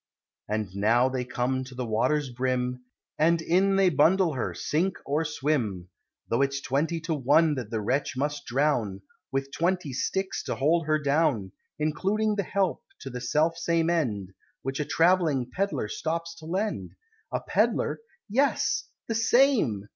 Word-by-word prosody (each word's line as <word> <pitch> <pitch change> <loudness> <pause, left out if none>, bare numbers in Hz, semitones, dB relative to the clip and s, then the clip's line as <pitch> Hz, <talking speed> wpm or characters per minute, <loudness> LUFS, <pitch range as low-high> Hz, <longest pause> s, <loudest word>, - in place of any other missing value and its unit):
And 105 -3 -2
now 115 +6 +3
they 130 -1 -2
come 125 +1 -1
to 130 0 -11
the 125 0 -3
water's 130 +5 +1
brim 125 0 -2 0.3
And 165 +2 +4
in 185 +4 +2
they 195 -1 +5
bundle 170 +3 +4
her 120 -8 -2
sink 165 - 0
or 150 +3 0
swim; 130 - -1 0.4
Though 115 - +1
it's 140 0 +1
twenty 145 +5 -1
to 165 0 -2
one 150 +3 +3
that 125 -6 -4
the 110 -1 -2
wretch 130 +5 -1
must 145 +1 -2
drown, 120 -8 0 0.3
With 135 0 -2
twenty 175 -3 -1
sticks 190 +8 -1
to - - -2
hold 160 +3 +2
her 155 0 +3
down; 145 - +1 0.3
Including 195 +8 0
the 205 - +1
help 195 0 -1 0.2
to 135 - -7
the 125 0 -5
self 155 +6 +1
same 170 0 +1
end, 105 - -1 0.3
Which 135 +2 -3
a 150 - 0
travelling 165 -8 +2
Pedlar 160 - -1
stops 165 +8 -3
to 160 - -10
lend. 200 +5 -2 0.4
A - - 0
Pedlar! - - 0 0.3
Yes! 265 +7 +1 0.2
The 225 - -1
same! 225 - +3
145 Hz, 160 wpm, -27 LUFS, 125-170 Hz, 0.4 s, they